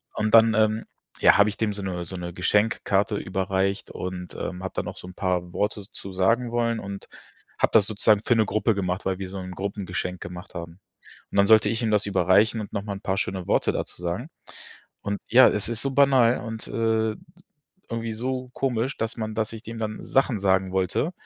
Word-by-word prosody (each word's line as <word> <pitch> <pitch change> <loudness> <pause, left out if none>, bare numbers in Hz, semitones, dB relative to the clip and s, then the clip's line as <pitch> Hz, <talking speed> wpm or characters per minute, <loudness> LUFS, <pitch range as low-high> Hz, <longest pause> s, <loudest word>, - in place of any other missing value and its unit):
und 110 0 -1
dann, 115 0 +7
ähm, 110 0 +2 0.3
ja, - - +6
habe 100 +1 +5
ich 100 - -7
dem 110 -2 0
so 100 - -7
'ne 90 -2 -3
so 95 - -8
'ne 85 -1 -6
Geschenkkarte 105 +2 +1
überreicht 95 0 -1
und, 90 -1 -6
ähm, 90 0 -5
habe 95 - -4
dann - - -2
auch - - -7
so - - -10
'n 90 - -10
paar 90 -2 -1
Worte 105 -1 -1
zu 95 - -9
sagen 115 +6 +2
wollen 115 -1 0
und 100 -1 -7 0.5
habe - - +3
das 110 -3 +6
sozusagen 105 -1 +3
für 120 - +3
'ne 110 -1 +3
Gruppe 110 +1 +1
gemacht, 90 -2 -2
weil 95 -1 -1
wir 95 -1 -5
so 95 0 -6
'n 90 0 -7
Gruppengeschenk 95 -1 -4
gemacht 90 +2 -8
haben. 85 +1 -7 0.5
Und - - -3
dann 100 - +5
sollte 110 -1 +6
ich 115 +2 -1
ihm 110 - +1
das 105 0 +2
überreichen 100 +4 +3
und 105 - -8
noch 100 - -2
mal 105 -1 -4
'n 100 - -8
paar 95 0 -1
schöne 95 -2 -2
Worte - - +2
dazu - - -5
sagen. 90 - -3 0.7
Und 100 0 -3
ja, 130 +2 +8
es 105 +1 -1
ist 115 -2 -2
so 135 - -1
banal 130 -4 +4
und, 115 -1 -7
äh, 110 -1 +1 0.8
irgendwie 115 -1 -3
so 125 +2 -3
komisch, 130 0 -1
dass 115 +1 -3
man 110 -2 -4
dass 110 0 -1
ich 110 0 -8
dem 115 0 -8
dann 110 -1 -4
Sachen 135 -4 +1
sagen 95 -1 +2
wollte 95 - 0
105 Hz, 215 wpm, -25 LUFS, 95-115 Hz, 0.8 s, ja